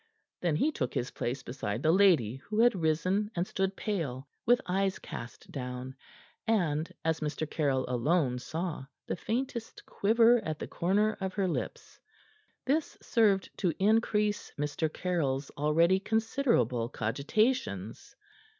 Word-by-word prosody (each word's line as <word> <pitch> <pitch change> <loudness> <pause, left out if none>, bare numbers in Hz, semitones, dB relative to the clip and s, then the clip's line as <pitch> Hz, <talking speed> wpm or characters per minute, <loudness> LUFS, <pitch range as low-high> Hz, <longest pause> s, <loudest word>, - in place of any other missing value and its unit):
Then 170 -4 +1
he 295 - +2
took 130 - -3
his 120 - -1
place 130 +3 -3
beside 115 -3 -4
the 160 - +5
lady, 165 - +4
who 210 +10 -4
had 240 +1 +6
risen, 185 +4 +1
and 175 +1 0
stood 190 0 -1
pale, 145 - -3 0.2
with 245 +1 +6
eyes 190 +1 0
cast 115 - -9
down 125 -1 -5 0.5
and 170 -7 +1
as 160 0 +1
Mr. 155 0 -2
Caryll 140 -4 0
alone 125 +1 +1
saw 160 0 -4 0.2
the - - -2
faintest 235 +3 -4
quiver 230 +2 +4
at 155 -3 -3
the - - -5
corners 205 +5 +1
of 190 -1 -3
her 195 -2 +1
lips. 175 - -4 0.7
This 295 +4 0
served 205 -5 +2
to 175 -5 +1
increase 210 0 +2
Mr. 150 +2 -1
Caryll's 145 -7 -1
already 165 +5 +3
considerable 210 - +1
cogitations. 140 - -1
170 Hz, 135 wpm, -30 LUFS, 140-210 Hz, 0.7 s, had